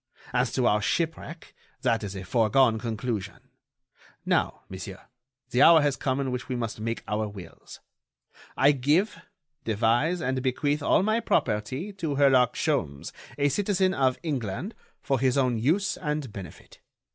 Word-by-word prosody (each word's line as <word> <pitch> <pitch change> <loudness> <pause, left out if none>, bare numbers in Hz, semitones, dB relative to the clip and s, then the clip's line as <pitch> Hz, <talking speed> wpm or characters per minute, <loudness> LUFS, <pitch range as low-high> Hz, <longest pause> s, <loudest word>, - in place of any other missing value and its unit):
As 125 -1 +1
to 130 - +1
our 105 -2 +3
shipwreck, 165 - -3 0.3
that 115 -4 +1
is 100 -1 -5
a 95 - -6
foregone 115 +4 +3
conclusion. 115 -3 -4 0.8
Now, - - 0
monsieur, 95 +1 -8 0.5
the 125 - +2
hour 165 +1 +8
has 145 -2 +1
come 130 0 -1
in 135 -2 -1
which 125 +2 -5
we 130 - -1
must 115 -3 -4
make 115 +1 -3
our 105 +1 -1
wills. 100 -3 -12 0.8
I 140 +2 +6
give, 150 - +1 0.4
devise 115 - +1
and 130 -2 -1
bequeath 145 +3 0
all 145 - +3
my 215 +2 +2
property 135 - -1
to 165 -7 -3
Herlock 130 -4 +4
Sholmes, 80 - -2 0.3
a 145 0 +2
citizen 190 +3 +1
of 130 -6 +1
England, 140 - -3 0.3
for 135 -2 0
his 130 +1 +2
own 125 -4 +1
use 175 - +1
and 150 - -3
benefit. 95 -4 -11
130 Hz, 150 wpm, -26 LUFS, 110-150 Hz, 0.8 s, hour